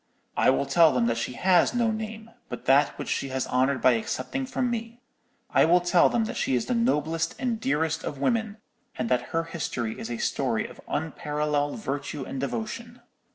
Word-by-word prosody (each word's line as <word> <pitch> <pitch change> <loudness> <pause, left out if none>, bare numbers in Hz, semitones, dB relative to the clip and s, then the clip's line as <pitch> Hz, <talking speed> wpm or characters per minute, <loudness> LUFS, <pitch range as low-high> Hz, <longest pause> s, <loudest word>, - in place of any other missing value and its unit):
"'I - - +4
will 135 +1 +2
tell 160 +3 +5
them 125 -2 +1
that 115 0 +1
she 120 - -3
has 185 - +3
no 235 -2 +2
name, 220 +1 -6 0.2
but - - -7
that 140 +2 +4
which - - -5
she 135 - -1
has 130 0 -1
honoured 130 +1 +1
by 130 - +7
accepting 260 - -2
from 250 -1 -1
me. 230 0 -5 0.5
I - - +5
will 175 +3 +5
tell 175 0 +4
them 230 -2 +1
that - - -5
she 130 - +1
is 125 - 0
the - - -1
noblest 165 - 0
and 240 -3 -1
dearest 160 -2 0
of 145 - -4
women, 220 - 0 0.4
and 125 -2 -2
that 125 -1 +2
her 165 0 0
history 140 -9 -4
is 115 - -5
a 120 - -3
story - - 0
of - - -11
unparalleled 150 -1 -1
virtue 145 -6 -4
and 135 - -5
devotion!' 120 -5 -4
150 Hz, 200 wpm, -26 LUFS, 135-220 Hz, 0.5 s, by